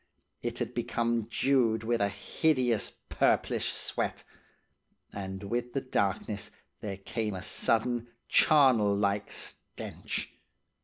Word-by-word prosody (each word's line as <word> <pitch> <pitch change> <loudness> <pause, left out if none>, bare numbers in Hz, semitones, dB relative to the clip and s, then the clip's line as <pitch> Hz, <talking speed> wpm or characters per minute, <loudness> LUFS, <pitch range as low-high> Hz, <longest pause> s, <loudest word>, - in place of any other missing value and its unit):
It - - -3
had - - -2
become 115 -2 0
dewed 115 -3 +2
with 115 0 +1
a 100 - +3
hideous, 120 +3 +1 0.2
purplish - - +2
sweat. - - -2 0.9
And 95 0 -5
with 120 +4 -2
the 135 - 0
darkness 100 -4 -1 0.3
there 100 -3 -4
came 105 +1 -3
a 95 - -6
sudden 120 +2 +1 0.2
charnel 125 -9 +5
like 100 0 0
stench. - - -3
110 Hz, 110 wpm, -30 LUFS, 100-120 Hz, 0.9 s, charnel